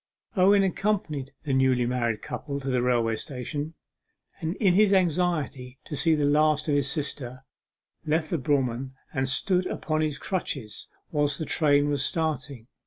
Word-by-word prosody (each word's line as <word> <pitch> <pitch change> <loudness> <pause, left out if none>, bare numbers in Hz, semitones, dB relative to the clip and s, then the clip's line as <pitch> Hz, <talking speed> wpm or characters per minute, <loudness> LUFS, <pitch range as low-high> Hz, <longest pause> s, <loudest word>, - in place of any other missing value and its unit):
Owen 195 +1 +5
accompanied 185 -8 -1
the 145 -4 -2
newly 130 -2 +3
married 120 -3 -1
couple 140 -1 -4
to 135 -1 -4
the 125 -1 +2
railway 120 -2 +2
station, 145 +5 -5 0.6
and 165 +3 -2
in 195 -5 +3
his 205 +1 +5
anxiety 165 -8 0
to 150 - -5
see 160 +2 +3
the 150 -1 +1
last 150 +1 +3
of 150 - +1
his 140 -1 +2
sister, 135 -3 -4 0.6
left 155 +1 0
the 170 - 0
brougham 130 -1 -1 0.2
and 130 0 0
stood 185 +6 +2
upon 155 -1 -1
his 150 -2 -1
crutches 140 - -3 0.2
whilst 145 -2 +1
the 160 - -3
train 145 -2 +3
was 145 -2 0
starting. 150 -6 -2
145 Hz, 160 wpm, -26 LUFS, 130-160 Hz, 0.6 s, Owen